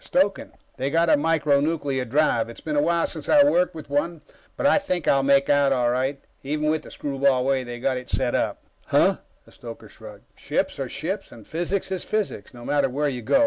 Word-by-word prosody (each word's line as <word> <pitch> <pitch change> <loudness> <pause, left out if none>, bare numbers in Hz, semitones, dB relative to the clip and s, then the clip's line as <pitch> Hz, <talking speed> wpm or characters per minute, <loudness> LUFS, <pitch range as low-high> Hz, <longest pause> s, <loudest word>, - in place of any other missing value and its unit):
"Stoking. 195 +2 0 0.2
They've 135 +1 -2
got 165 +1 +3
a - - +7
micro 150 -2 +2
nuclear 145 -4 -1
drive. 125 -3 +1
It's 115 - -10
been 155 -2 -4
a 145 - +3
while 170 +2 +2
since 160 -4 -7
I 295 -1 +7
worked 180 - +2
with 155 - -8
one, 150 +3 -1 0.4
but - - -2
I 285 - +5
think 185 - -3
I'll 135 - +4
make 140 0 +3
out 145 -1 +3
all 125 -2 +2
right, 130 +3 -1 0.2
even 150 +2 -1
with 155 - -1
the - - -13
screwball 135 -2 0
way 135 -1 +1
they've 120 0 -8
got 130 -1 +1
it 125 - -8
set 125 -2 0
up." - - -1 0.2
"Huh?" - - +3 0.3
The - - -19
stoker - - -10
shrugged. - - -13
"Ships - - -2
are - - -3
ships, - - -4
and 110 -3 -14
physics 175 +5 -2
is 190 - -2
physics, 210 - -3
no 120 -1 -12
matter 145 -2 +1
where 145 +4 -1
you 125 -3 -5
go. 115 - +3
145 Hz, 225 wpm, -24 LUFS, 130-165 Hz, 0.4 s, a